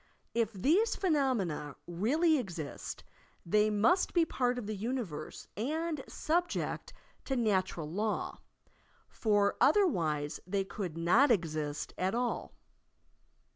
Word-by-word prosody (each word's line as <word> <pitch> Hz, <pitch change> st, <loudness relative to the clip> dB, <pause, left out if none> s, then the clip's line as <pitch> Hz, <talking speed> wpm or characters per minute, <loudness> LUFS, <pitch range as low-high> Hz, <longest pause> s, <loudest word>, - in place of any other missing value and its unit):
If 230 Hz, -2 st, +1 dB
these 330 Hz, -, +2 dB
phenomena 245 Hz, -, 0 dB
really 285 Hz, -, +2 dB
exist 175 Hz, -, -6 dB, 0.4 s
they 210 Hz, +5 st, +3 dB
must 220 Hz, -, +3 dB
be 340 Hz, -1 st, +5 dB
part 250 Hz, -4 st, 0 dB
of 245 Hz, -, -4 dB
the 215 Hz, +1 st, -3 dB
universe 210 Hz, -, -4 dB
and 305 Hz, +6 st, -2 dB
subject 345 Hz, +2 st, -1 dB, 0.3 s
to 270 Hz, -, -1 dB
natural 190 Hz, -9 st, 0 dB
law, 210 Hz, +7 st, -2 dB, 0.7 s
for 205 Hz, -2 st, +2 dB
otherwise 165 Hz, -, +2 dB
they 195 Hz, +1 st, 0 dB
could 190 Hz, -4 st, -5 dB
not 200 Hz, +13 st, +4 dB
exist 155 Hz, -8 st, -1 dB
at 190 Hz, +3 st, +1 dB
all. 245 Hz, 0 st, -2 dB
215 Hz, 110 wpm, -32 LUFS, 175-275 Hz, 0.7 s, be